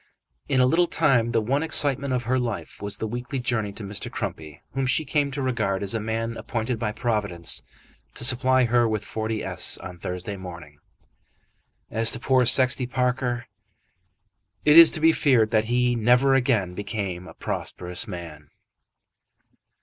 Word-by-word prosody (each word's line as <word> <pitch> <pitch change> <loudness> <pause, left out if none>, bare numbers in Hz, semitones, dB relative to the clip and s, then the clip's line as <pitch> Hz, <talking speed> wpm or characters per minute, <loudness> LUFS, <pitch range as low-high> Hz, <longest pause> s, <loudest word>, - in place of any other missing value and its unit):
In 130 - +2
a 125 - +5
little 170 +7 +2
time 120 -8 +2
the 115 -2 +1
one 135 +6 0
excitement 140 -4 +1
of 125 -1 -1
her 130 +2 0
life 120 -3 -5
was 100 0 -2
the 110 - -4
weekly 120 +5 -5
journey 120 -5 -2
to 105 - -8
Mr. 100 +1 -2
Crumpy, 75 -2 -7
whom 135 -1 -1
she 155 +4 +1
came 145 0 0
to 140 0 -5
regard 110 -7 -1
as 100 - -3
a 115 - -1
man 115 +1 -3
appointed 115 0 -4
by 110 -2 -2
Providence 105 -7 -1 0.5
to - - -5
supply 130 +1 +5
her 120 0 +2
with 110 -2 -2
40s. 110 0 -2
on 90 -1 -9
Thursday 90 +3 -5
morning. 85 -6 -11 1.1
As 115 +1 +4
to 115 - -4
poor 130 -1 +2
Sexty 130 0 +5
Parker, 125 -1 -2 1.2
it 150 0 +5
is 165 -1 +10
to - - -3
be 160 +1 +5
feared 125 -9 +2
that 110 -1 +2
he 125 +1 +1
never 125 +4 +3
again 120 -9 +1
became 100 -3 -5
a 80 - -13
prosperous 90 0 -3
man. 75 -4 -9
115 Hz, 165 wpm, -24 LUFS, 105-130 Hz, 1.2 s, is